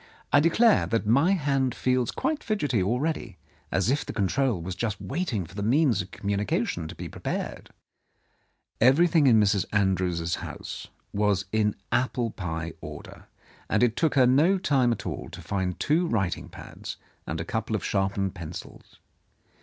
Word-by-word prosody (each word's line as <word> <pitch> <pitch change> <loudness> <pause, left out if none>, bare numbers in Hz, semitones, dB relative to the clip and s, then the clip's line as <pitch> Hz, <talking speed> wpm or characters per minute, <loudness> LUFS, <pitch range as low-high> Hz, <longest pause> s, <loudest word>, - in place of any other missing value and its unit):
I 145 - +8
declare 205 +9 +4
that 115 -1 0
my 140 - +4
hand 140 -7 +1
feels 125 -2 +1
quite 315 -2 -2
fidgety 145 - 0
already, 120 - -1 0.3
as 95 +6 +2
if 145 - +1
the - - -6
control 115 +1 +1
was 90 +3 -5
just 110 +2 -3
waiting 135 - -2
for 85 - -15
the 100 - -5
means 120 - +3
of 95 - -8
communication 100 -6 -1
to - - -9
be - - -6
prepared." - - -5 1.1
Everything 155 +4 +5
in 115 -4 +6
Mrs. 100 -2 +3
Andrews's 90 -4 +1
house - - -7 0.3
was 100 -2 +1
in 105 -1 +1 0.2
apple 120 -2 0
pie 85 -4 -4
order, - - -10 0.4
and 105 +3 +3
it 120 -2 +3
took 160 -3 +1
her 130 -2 +6
no 150 +10 +4
time 135 -9 +2
at 115 - -3
all - - -5
to - - -10
find 95 -3 -2
two 165 +4 +2
writing 95 - -1
pads - - -9 0.3
and 80 +1 -3
a 80 - -3
couple 110 +3 -2
of 100 - -3
sharpened 95 -1 0
pencils. 85 -1 -9
110 Hz, 160 wpm, -27 LUFS, 95-140 Hz, 1.1 s, I